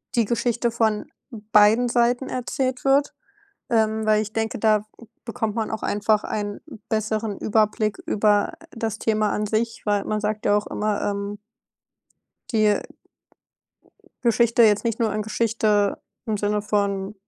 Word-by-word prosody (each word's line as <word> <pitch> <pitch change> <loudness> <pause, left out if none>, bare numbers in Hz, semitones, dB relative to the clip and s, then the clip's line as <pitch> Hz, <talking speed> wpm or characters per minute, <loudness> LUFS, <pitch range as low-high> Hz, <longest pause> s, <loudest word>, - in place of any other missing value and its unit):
die 235 - +3
Geschichte 235 +1 0
von 220 -2 0 0.2
beiden 215 +2 +3
Seiten 245 +2 +1
erzählt 255 +1 -2
wird. 280 +2 +3 0.6
Ähm, 220 -1 +1
weil 215 0 +4
ich 215 0 -7
denke, 225 0 -2
da 215 -1 +2 0.4
bekommt 225 -2 -3
man 220 -1 -1
auch 220 - -4
einfach 210 +1 +1
einen 205 -1 -4 0.3
besseren 215 -1 -1
Überblick 215 0 +1
über 205 -1 +2 0.2
das 225 -2 -4
Thema 215 -2 +1
an 210 0 -1
sich, 225 +2 -2
weil 205 -1 +1
man 215 0 -2
sagt 210 0 -2
ja 205 - +3
auch 210 - -1
immer, 210 -1 -2
ähm 200 0 -3 1.1
die 215 -2 +3 1.4
Geschichte, 235 0 +4
jetzt 210 0 +4
nicht 230 +1 -1
nur 220 -2 +1
in 215 - -1
Geschichte, 215 -2 0 0.2
im 215 -2 -1
Sinne 205 +1 0
von 200 -1 -1
215 Hz, 140 wpm, -23 LUFS, 210-230 Hz, 1.4 s, weil